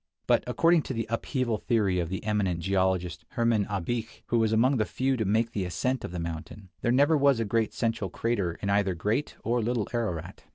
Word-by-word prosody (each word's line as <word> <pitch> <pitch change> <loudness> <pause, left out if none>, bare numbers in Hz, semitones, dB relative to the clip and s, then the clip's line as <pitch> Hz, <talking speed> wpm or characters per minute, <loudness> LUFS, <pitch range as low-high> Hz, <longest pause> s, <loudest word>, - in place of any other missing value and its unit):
But - - +3
according 165 0 +4
to 130 - -2
the 115 -1 -1
upheaval 120 -1 -1
theory 105 -7 +1
of 85 -2 -2
the 95 - -4
eminent 105 -5 0
geologist, 95 -1 0
Hermann 115 -4 +2
Abich, 110 +4 -3
who 120 - +2
was 110 -1 +2
among 125 +5 +3
the 110 - +1
few 130 +4 0
to 110 -3 -1
make 110 +4 +1
the 100 -4 -2
ascent 125 +8 -1
of - - -4
the 90 - -5
mountain, 85 +4 -6
there 120 - +1
never 145 +5 +4
was 140 -4 +4
a 115 - 0
great 110 +1 +1
central 115 -4 -1
crater 100 -5 -1
in 100 - +1
either 100 -2 +2
Great 105 - -1
or 120 +1 +1
Little 115 -1 -1
Ararat. 110 -9 -3
110 Hz, 210 wpm, -28 LUFS, 95-120 Hz, -, according